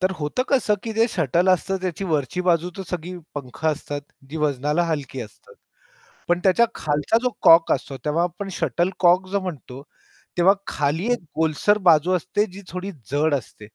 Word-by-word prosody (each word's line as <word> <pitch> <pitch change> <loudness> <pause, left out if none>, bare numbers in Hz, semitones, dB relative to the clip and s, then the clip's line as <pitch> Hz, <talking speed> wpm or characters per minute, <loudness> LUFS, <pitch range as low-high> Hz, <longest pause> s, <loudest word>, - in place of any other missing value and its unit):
तर 185 0 +2
होतं 150 +12 -1
कसं, 255 -6 +3
की 225 - -4
जे 225 +2 +3
शटल 175 - +1
असतं 190 +1 +2
त्याची 185 +1 -3
वरची 155 -1 -1
बाजू 170 +1 +2
तर 195 - -4
सगळी 180 +1 -4 0.2
पंख 140 +2 -8
असतात, 145 -2 -2 0.3
जी 160 - -5
वजनाला 150 +1 0
हलकी 145 -5 -3
असतात. 455 - -12 0.7
पण 175 0 +2
त्याच्या 205 +5 +5
खालचा 150 +8 +1
जो 250 - +2
कॉक 165 0 +7
असतो, 135 - -2
तेव्हा 155 +3 +1
आपण 180 +3 -4
शटलकॉक 180 +1 +2
जो 200 - 0
म्हणतो, 140 -7 -7 0.6
तेव्हा 185 +3 +6
खाली 145 +6 -1
एक 240 - -2 0.2
गोलसर 160 +6 +2
बाजू 160 +2 +5
असते 185 +4 0
जी 195 - -10
थोडी 185 +3 -5 0.2
जड 150 +2 +2
असते. 120 -5 -7
170 Hz, 170 wpm, -23 LUFS, 150-190 Hz, 0.7 s, कॉक